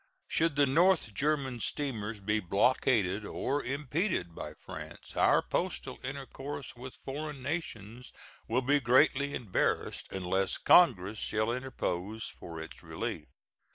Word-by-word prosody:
Should 165 -3 +2
the 145 -1 +5
North 165 - +3
German 135 +1 0
steamers 115 -6 -2
be 105 +2 +1
blockaded 105 0 +2
or 140 +7 -2
impeded 140 - -1
by - - -7
France, - - -9
our - - +4
postal - - -2
intercourse 135 +1 -6
with 125 +1 -9
foreign 145 0 -5
nations 125 - -5 0.4
will 125 +3 +1
be 145 +3 +4
greatly 140 +2 +4
embarrassed 110 -7 -1
unless 95 +1 0
Congress 110 - +5
shall 110 +2 0
interpose 110 -5 -3
for 85 -1 -7
its 80 - -9
relief. - - -4
130 Hz, 120 wpm, -31 LUFS, 105-145 Hz, 0.4 s, the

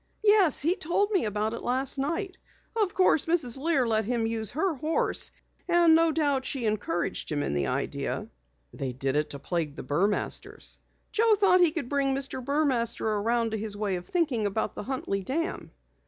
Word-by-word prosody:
"Yes, 410 -10 +5
he 340 +4 +3
told 400 +6 0
me 380 - +2
about 210 +1 -1
it 230 - -5
last 260 +2 +1
night. 350 +7 -2 0.4
Of 420 -5 0
course 365 -5 +3
Mrs. 300 -7 +2
Lear 290 -3 +1
let 220 -1 +1
him 230 +1 -1
use 225 -2 +1
her 330 +6 0
horse, 310 +3 -1 0.4
and 345 -2 +5
no 330 0 +4
doubt 285 -4 +1
she 260 -2 -2
encouraged 200 -8 -2
him 145 -1 -1
in - - -2
the 70 -2 0
idea." - - -3 0.5
"They 130 -2 -4
did 135 +2 -2
it 150 0 0
to 140 - -3
plague 155 -1 -3
the - - -7
Burmasters?" 180 +10 -2 0.3
"Joe 445 0 +4
thought 395 -3 +4
he 350 - +7
could 315 -5 -4
bring 275 0 0
Mr. 270 -1 -2
Burmaster 265 -5 0
around 225 +2 0
to 220 - -2
his 210 -1 -2
way 205 -2 -1
of 175 0 -7
thinking 290 - 0
about 205 +2 -2
the - - -6
Huntley 210 -5 -3
Dam." 325 - -3
260 Hz, 185 wpm, -27 LUFS, 210-330 Hz, 0.5 s, he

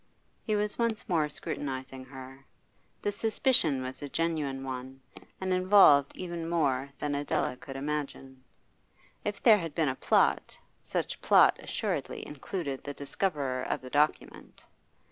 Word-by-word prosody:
He 215 - -1
was 210 +1 0
once 230 -2 -1
more 160 -4 +1
scrutinising 130 -3 -5
her. 135 0 -11 0.6
The 205 - +1
suspicion 205 - +2
was 130 +2 -6
a 145 - -5
genuine 150 -4 -1
one, 130 0 -6 0.4
and 185 -1 -1
involved 185 -7 +6
even 170 -2 -4
more 140 -5 +1
than 145 -1 -2
Adela 145 -2 -1
could 135 +1 -9
imagine. 135 -2 -5 0.8
If 205 -1 -4
there 220 -3 +7
had 165 -4 -6
been 160 -4 +2
a 130 - -2
plot, - - +2 0.2
such - - -3
plot - - +5
assuredly - - -3
included 145 -1 -5
the 145 -1 -6
discoverer 140 -4 -2
of - - -2
the 130 0 -10
document. 150 +1 -1
145 Hz, 140 wpm, -29 LUFS, 135-180 Hz, 0.8 s, there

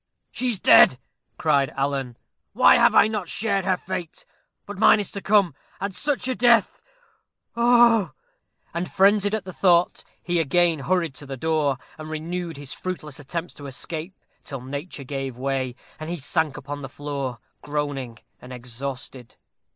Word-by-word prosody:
"She 255 - -2
is 230 - 0
dead!" 130 - +7 0.4
cried 140 -4 +2
Alan. 135 -3 -2 0.4
"Why - - +6
have - - +4
I - - +7
not 210 -5 -4
shared 200 -3 0
her 185 -1 +2
fate? 170 -2 -6 0.4
But 205 -1 -8
mine 220 - +6
is 205 - -4
to 200 - -6
come. 200 -6 +3 0.3
And 200 0 -3
such 285 +4 -1
a 260 - 0
death! 240 -4 +3 0.7
oh, 235 -3 +5
oh!" - - -26 0.6
And, 170 +2 -3
frenzied 205 +2 +3
at 220 - -4
the 185 - -8
thought, 175 -2 +2 0.2
he 175 -1 0
again 165 +1 +2
hurried 165 0 0
to 145 - -8
the 135 -1 -6
door, 155 -2 0 0.2
and 155 0 -7
renewed 165 +1 -4
his 140 -2 -6
fruitless 155 -6 -6
attempts 165 +5 -5
to 145 - -10
escape, 160 +7 -6 0.3
till 135 -3 -7
nature 140 +3 -6
gave 135 -2 -5
way, 130 -1 -2 0.2
and 155 +1 -6
he 175 - -3
sank 155 0 0
upon 145 +1 -7
the 135 - -7
floor, 140 -3 -5 0.2
groaning 145 -5 -4 0.2
and 125 - -11
exhausted. 125 0 -7
155 Hz, 165 wpm, -24 LUFS, 135-190 Hz, 0.7 s, dead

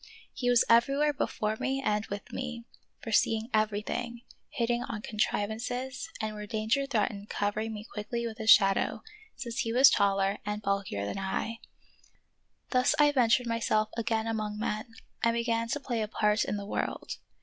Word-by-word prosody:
He 245 -3 -1
was 245 -1 +5
everywhere 275 +6 +4
before 215 -5 -2
me 270 +3 -1
and 210 -5 0
with 200 0 -7
me; 240 -2 -5 0.4
fore 225 - -4
seeing 225 +2 +2
everything, 220 +3 -1 0.3
hitting 240 0 0
on 225 -3 -5
contrivances, 235 +6 -2
and 215 -1 -2
where 210 0 -7
danger 220 +6 0
threatened 210 -5 -1
covering 210 +2 -1
me 210 0 -8
quickly 235 +3 -3
with 225 0 -6
his 220 0 -1
shadow, 195 -2 +5 0.3
since 235 -3 -5
he 225 - 0
was 260 +4 +7
taller 195 0 +2
and 210 +1 -4
bulkier 195 - -1
than 150 - -4
I. 220 +4 -3 1.1
Thus 255 -1 +3
I 295 -1 +5
ventured 250 -2 +3
myself 230 -2 +1
again 225 -1 0
among 215 -2 -2
men 215 +1 -3 0.3
and 230 0 +3
began 230 -1 0
to 270 +5 -2
play 240 -5 -2
a 215 - -1
part 210 0 +1
in 205 - -2
the 200 - -5
world. - - -3
225 Hz, 165 wpm, -29 LUFS, 210-240 Hz, 1.1 s, was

